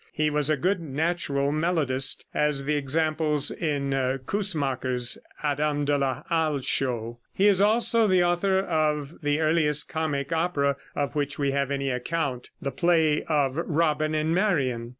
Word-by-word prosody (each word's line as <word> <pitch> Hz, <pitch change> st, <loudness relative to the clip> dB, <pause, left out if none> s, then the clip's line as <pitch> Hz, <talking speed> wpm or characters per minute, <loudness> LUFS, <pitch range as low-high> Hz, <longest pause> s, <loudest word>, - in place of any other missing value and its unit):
He 155 Hz, 0 st, 0 dB
was 150 Hz, 0 st, +1 dB
a 155 Hz, -, +2 dB
good 185 Hz, +7 st, 0 dB
natural 145 Hz, -2 st, -1 dB
melodist, 150 Hz, -5 st, +1 dB
as 150 Hz, -2 st, 0 dB
the 150 Hz, +2 st, -1 dB
examples 150 Hz, +1 st, 0 dB
in 145 Hz, -4 st, -2 dB, 0.3 s
Coussemaker's 135 Hz, -, 0 dB, 0.2 s
"Adam 145 Hz, 0 st, 0 dB
de 145 Hz, 0 st, +1 dB
la 135 Hz, -3 st, -2 dB
Halle" 155 Hz, -4 st, 0 dB
show. 120 Hz, -3 st, -1 dB, 0.2 s
He 195 Hz, -, +2 dB
is 200 Hz, -2 st, +4 dB
also 225 Hz, +1 st, +4 dB
the 185 Hz, -2 st, +3 dB
author 175 Hz, +2 st, +1 dB
of 155 Hz, -4 st, -1 dB
the 145 Hz, 0 st, 0 dB
earliest 155 Hz, -2 st, +2 dB
comic 150 Hz, -3 st, -3 dB
opera 160 Hz, -4 st, 0 dB, 0.2 s
of 140 Hz, -, -2 dB
which 145 Hz, -1 st, -2 dB
we 140 Hz, -1 st, 0 dB
have 140 Hz, -1 st, -1 dB
any 140 Hz, -1 st, -2 dB
account, 130 Hz, 0 st, -3 dB
the 140 Hz, -, -4 dB
play 160 Hz, 0 st, +2 dB
of 145 Hz, -4 st, 0 dB
"Robin 155 Hz, -2 st, 0 dB
and 155 Hz, +1 st, 0 dB
Marion." 135 Hz, -, 0 dB
150 Hz, 150 wpm, -25 LUFS, 140-165 Hz, 0.3 s, is